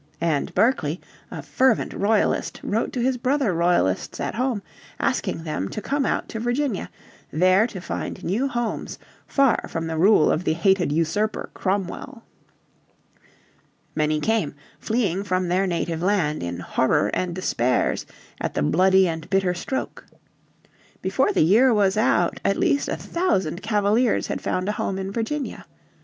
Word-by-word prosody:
And 160 -4 0
Berkeley, 180 - +2 0.3
a - - -7
fervent 260 -3 +1
Royalist, 210 +1 +1
wrote 220 +3 -1
to 245 - -1
his 260 0 +1
brother 255 -4 +1
Royalists 170 - +1
at - - -2
home 245 -4 -1 0.4
asking 165 - -1
them 150 - -3
to - - -5
come 275 +5 -1
out - - -1
to 225 - -5
Virginia, 240 -1 -1 0.4
there 185 +7 +4
to 205 -6 -8
find 180 - -5
new 225 +10 0
homes 240 -4 -3 0.3
far 275 -4 +2
from 165 -1 -3
the 160 -1 -3
rule 190 -2 +5
of 165 - 0
the 160 - +1
hated 175 0 +2
"usurper" 165 +8 -1
Cromwell. 205 +6 -3 1.7
Many 155 0 +1
came, 210 -6 0 0.2
fleeing 200 -5 0
from 185 -2 -1
their 190 +2 +2
native 170 -2 -2
land 175 -6 +1
"in 85 0 -4
horror 130 +9 +1
and 180 -2 -1
despairs 125 -9 0 0.3
at - - -3
the - - +1
bloody 190 - +4
and 160 -1 -5
bitter 195 -2 +2
stroke." 180 +9 -5 1.0
Before - - +2
the - - +3
year 225 +10 +5
was 200 -4 +3
out 245 +6 +2
at 195 - +1
least 285 - +1
a - - -2
thousand 195 - -1
Cavaliers 210 +2 +2
had - - -4
found 185 +1 -2
a - - +1
home 195 -2 -2
in 195 0 -4
Virginia. 240 +7 -4
195 Hz, 150 wpm, -23 LUFS, 170-230 Hz, 1.7 s, rule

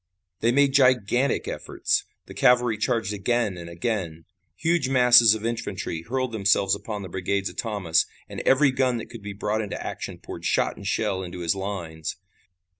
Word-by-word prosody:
They 115 - +2
made 140 +1 +3
gigantic 130 -1 +3
efforts. - - -1 0.2
The - - -11
cavalry 125 -2 +3
charged 110 0 -1
again 105 0 0
and 85 -1 -8
again. 85 -3 -3 0.3
Huge 165 -4 0
masses 125 -4 +7
of 110 0 -6
infantry 105 -7 -3
hurled 130 +6 -2
themselves 100 -2 +2
upon 105 -3 -4
the - - -6
brigades 95 +2 -2
of - - -14
Thomas, 100 -8 0 0.2
and - - -7
every 135 +1 +4
gun 130 -2 +1
that 115 - -8
could 115 - -9
be 100 0 -6
brought 105 +2 -1
into 105 - -5
action - - -6
poured - - -9
shot - - +1
and - - -8
shell 95 - 0
into 90 -1 -7
his 85 -1 +1
lines. 85 -5 -5
110 Hz, 175 wpm, -25 LUFS, 95-125 Hz, 0.3 s, masses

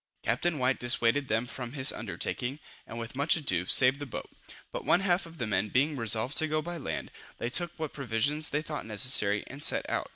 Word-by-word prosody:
Captain 150 +9 -1
White 130 0 0
dissuaded 120 +2 +1
them 110 +1 -1
from 125 -1 -7
this 130 -2 +4
undertaking, 130 +3 -4 0.3
and 115 - -9
with 115 +1 -8
much 140 +4 +2
ado, 95 - -1
saved 130 +5 +6
the 145 - -7
boat; - - -8 0.4
but - - -6
one 180 - +2
half 180 -2 0
of 165 0 -15
the 120 - -4
men 105 -1 -2
being 145 +6 0
resolved 115 +2 +4
to 155 - +2
go 155 0 -1
by 175 +3 -6
land, 150 - -6 0.3
they 120 - -5
took 175 +4 -1
what 155 -2 -6
provisions 140 +4 -1
they 150 +1 -3
thought 150 -1 -6
necessary, 105 -2 +4
and 135 +2 -10
set - - 0
out. - - -3
130 Hz, 215 wpm, -28 LUFS, 115-150 Hz, 0.4 s, saved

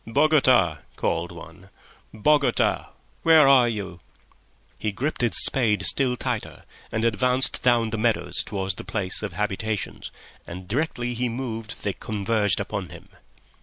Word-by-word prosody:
"Bogota!" 130 - +3 0.2
called - - -2
one. - - -13 0.4
"Bogota! 140 +6 +1 0.3
where 160 -3 +6
are 130 -3 +5
you?" 95 -6 -6 0.8
He 110 - -2
gripped 135 +10 -3
his 120 -2 +2
spade 115 -6 +2
still 125 -3 +1
tighter - - -4 0.3
and 110 +1 -1
advanced 125 +4 +1
down 120 -3 +2
the 115 - -3
meadows 115 0 0
towards 95 -2 -3
the - - -9
place 95 0 -3
of 105 -5 -5
habitations, 105 +2 -3 0.4
and 90 +2 -9
directly 120 - -2
he 120 +1 -2
moved 115 -3 -6
they 100 - -1
converged 105 -1 -1
upon - - -4
him. - - -13
115 Hz, 135 wpm, -24 LUFS, 105-125 Hz, 0.8 s, where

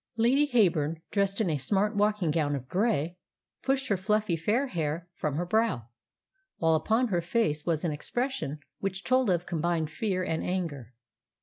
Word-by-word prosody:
Lady 260 +6 +4
Heyburn, 170 - +2
dressed 200 0 +1
in 220 - +2
a 150 - -1
smart 205 - +1
walking 205 -5 +2
gown 150 -2 +1
of 130 -2 -6
grey, 180 - 0 0.4
pushed 270 0 0
her 200 - +2
fluffy 210 -1 +1
fair 210 - +1
hair 165 - -3
from 150 -4 -2
her 175 +4 -1
brow, 175 - 0 0.7
while 165 -1 +3
upon 220 +10 +2
her 175 -4 +1
face 165 -5 0
was 160 -3 +1
an 165 - +1
expression 200 - -2 0.2
which 195 0 -3
told 255 -2 +3
of 175 -1 +1
combined 165 -2 -1
fear 185 +2 -1
and 160 -2 -1
anger. 145 - -3
180 Hz, 170 wpm, -29 LUFS, 155-215 Hz, 0.7 s, Lady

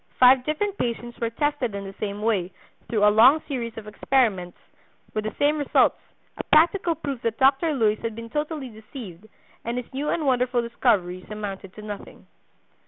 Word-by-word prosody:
Five 255 0 +7
different 395 +7 -2
patients 240 0 -3
were 230 - 0
tested 275 -3 -1
in 200 - -4
the 195 0 -8
same 205 0 -4
way, 195 -5 0 0.4
through 210 -2 +3
a 210 - +5
long 255 +8 +7
series 235 -6 -4
of 220 - -7
experiments, 210 -5 0 0.6
with 215 0 -2
the 215 - -4
same 295 +1 +2
results, 290 - +3 0.4
a - - -2
practical 335 +2 +3
proof 280 -5 -5
that 230 -1 -2
Dr. 275 +5 +3
Luys 215 -4 +2
had 230 -2 -4
been 230 0 -8
totally 295 -3 -3
deceived 220 - -11 0.4
and 235 +1 -3
his 250 +1 -6
new 285 +3 -2
and 320 - -1
wonderful 250 -2 +2
discoveries 185 -6 0
amounted 200 -3 -6
to 215 - -10
nothing. 205 -1 -9
235 Hz, 175 wpm, -24 LUFS, 210-275 Hz, 0.6 s, Five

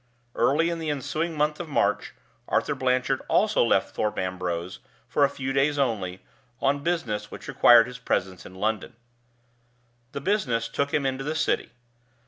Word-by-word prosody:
Early 165 +5 +2
in 170 - -3
the 160 -1 -3
ensuing 155 +3 -2
month 150 +1 +1
of 170 -2 -6
March, 145 - 0 0.3
Arthur - - +1
Blanchard 130 +1 0
also 215 - +3
left 115 - +1
Thorpe 105 - -1
Ambrose, 90 -1 -3 0.3
for 145 - +2
a 140 - +5
few 135 0 -4
days 140 +2 +2
only, 100 -9 -1 0.4
on 140 +1 +1
business 115 -11 -2
which - - -10
required 120 -1 +7
his 125 0 -9
presence 95 -6 -2
in 95 - -12
London. 110 +4 -2 1.2
The 140 - -3
business 130 - 0
took 140 +4 -1
him 145 -2 0
into 135 0 -1
the 155 +3 -2
City. 155 0 0
135 Hz, 160 wpm, -26 LUFS, 110-150 Hz, 1.2 s, required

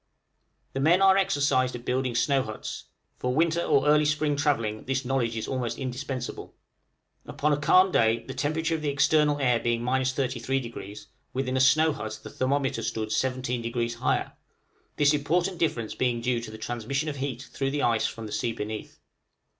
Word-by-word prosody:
The 135 - -2
men 165 +6 +4
are 190 0 +7
exercised 145 -10 +2
at 120 - -8
building 125 -1 -1
snow 135 +3 +2
huts; 110 -3 -6 0.3
for 125 0 -1
winter 165 +2 +2
or 140 -4 +2
early 150 0 +5
spring 150 0 +1
travelling, 115 -7 0
this 135 0 -1
knowledge 120 -3 0
is 110 - -3
almost 125 -3 -2
indispensable. 130 -1 -5 0.7
Upon 150 +1 0
a - - +1
calm 185 +6 +5
day 115 -4 +2
the 130 - -6
temperature 155 +4 -1
of 160 - -2
the 150 - -1
external 145 +1 +3
air 125 -4 +2
being 120 0 -1
33°, 125 -4 -2 0.3
within 130 0 -1
a - - +2
snow 155 +4 +5
hut 110 -5 -6
the - - -9
thermometer 135 -2 0
stood 110 -1 -3
17° 120 0 -1
higher, 130 - 0 0.6
this 145 0 +4
important 170 +5 0
difference 115 -9 -1
being 125 -2 0
due 120 0 0
to 115 - -7
the 110 - -9
transmission 120 +6 -3
of 145 -2 -3
heat 135 -2 -4
through 135 -1 -1
the 145 +1 -1
ice 115 -2 +2
from 115 - -7
the 105 - -8
sea 115 +2 -1
beneath. 110 -1 -6
130 Hz, 175 wpm, -27 LUFS, 120-145 Hz, 0.7 s, are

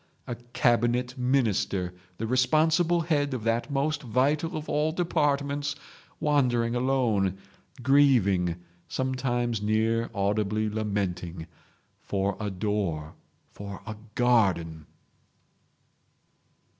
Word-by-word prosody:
A 120 - -4 0.2
Cabinet 120 +1 +2
Minister, 115 -8 0 0.2
the 115 - -3
responsible 160 +8 +3
head 145 -4 0
of 115 - -5
that 115 +3 0
most 145 +2 0
vital 145 +6 0
of 155 - -6
all 150 +2 +1
departments, 145 -4 0 0.4
wandering 125 -6 +2
alone—grieving—sometimes 120 - 0
near 110 +2 +1
audibly 105 +2 0
lamenting—for 95 -1 -4
a 105 -1 -2
door, 95 -6 -2 0.4
for 100 -1 -8
a 110 - -5 0.2
garden!" 95 -11 +2
115 Hz, 80 wpm, -27 LUFS, 100-135 Hz, 0.4 s, responsible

